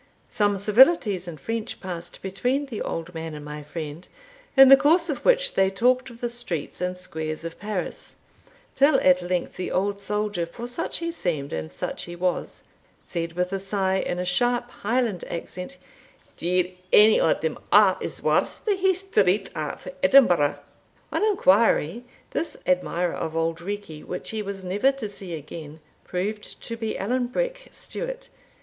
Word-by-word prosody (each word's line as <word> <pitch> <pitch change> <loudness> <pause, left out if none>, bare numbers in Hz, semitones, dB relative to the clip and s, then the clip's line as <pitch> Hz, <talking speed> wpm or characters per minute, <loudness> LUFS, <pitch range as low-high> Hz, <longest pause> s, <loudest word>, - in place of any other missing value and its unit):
Some 205 -1 +2
civilities 210 - +4
in 165 -3 -6
French 225 +9 -4
passed 175 -2 -7
between 245 +9 -1
the 240 -6 -6
old 165 +2 -4
man 160 -1 -5
and 150 0 -8
my 150 0 -6
friend, 155 +2 -7 0.5
in 270 0 +10
the 270 - +12
course 325 +4 +3
of 275 - -5
which - - +3
they 190 0 +3
talked 250 +6 +2
of 235 -1 -14
the 240 - 0
streets 235 -11 -4
and 180 0 -2
squares 160 -3 -5
of 165 - -7
Paris, 205 -3 -5 0.6
till 280 +3 +4
at 180 0 +5
length 180 0 -2
the 185 - -3
old 200 +2 0
soldier, 205 -3 -1
for 235 +8 -8
such 245 +7 -3
he 335 0 -2
seemed, 155 - -3
and 80 0 -4
such 80 - -4
he 175 - -8
was, 180 0 -2 0.4
said 165 -1 -3
with 180 +2 -1
a 195 - -1
sigh, 190 -1 0
in 175 - -2
a 180 - -2
sharp 245 +6 +1
Highland 225 -4 -1
accent, 180 +8 -6 0.6
"Deil 180 +1 0 0.2
ane 215 +1 +7
o' - - +4
them 475 - -3
a' - - +7
is - - -3
worth - - +1
the 410 -3 +2
Hie 380 0 +3
Street 210 - +1
of 155 -1 -5
Edinburgh!" 180 - +5 0.5
On - - 0
inquiry, 230 - +3 0.3
this 330 - -3
admirer 180 -1 +1
of 160 - -4
Auld 165 0 0
Reekie, 195 -5 -6
which 180 - -5
he 220 -1 -2
was 200 -2 -5
never 200 +9 +2
to 265 -6 -5
see 195 -4 -7
again, 155 0 -9 0.2
proved 205 +4 -4
to 230 - -3
be 225 -1 -3
Allan 245 +5 0
Breck - - -3
Stewart. - - -6
195 Hz, 170 wpm, -25 LUFS, 175-245 Hz, 0.6 s, the